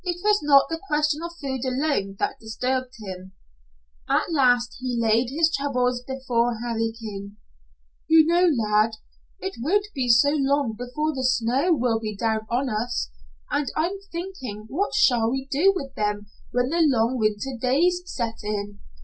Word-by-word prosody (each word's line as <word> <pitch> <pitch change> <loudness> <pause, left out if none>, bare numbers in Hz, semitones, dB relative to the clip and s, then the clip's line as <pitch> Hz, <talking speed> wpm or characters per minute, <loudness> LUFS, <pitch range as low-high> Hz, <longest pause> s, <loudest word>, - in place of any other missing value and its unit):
It 350 -2 -2
was 420 0 +3
not 280 -2 +5
the 325 0 -4
question 300 -1 +1
of 340 0 -7
food 265 -3 -3
alone 260 -7 -1
that - - -2
disturbed 255 +3 -3
him. 190 -3 -8 0.8
At - - +1
last 245 -5 +2
he 255 -2 -2
laid 230 +2 +2
his 320 +4 +1
troubles 250 -3 0
before 245 -3 -1
Harry 225 -1 -1
King. 200 -2 -7 0.7
"You 320 -1 +6
know, 345 +2 +4 0.2
lad, 215 +1 +3 0.5
it 385 0 -5
won't 400 +10 +2
be 255 -4 -1
so 240 +5 +6
long 280 -4 +1
before 250 +7 -2
the 260 -2 -3
snow 255 +6 +2
will 235 -4 +1
be 215 -2 -4
down 220 0 -1
on 255 +4 0
us, 215 - -2 0.4
and 290 -3 0
I'm 360 +5 -1
thinking 300 - -6
what 370 - -1
shall 245 - +4
we 265 +2 -3
do 335 +8 +4
with 275 -7 -5
them 210 -1 -2 0.2
when 245 +1 0
the 335 +3 +1
long 255 -4 +2
winter 215 +4 -1
days 335 +9 +2
set 235 -9 -4
in." 205 -1 -4
255 Hz, 165 wpm, -24 LUFS, 225-300 Hz, 0.8 s, You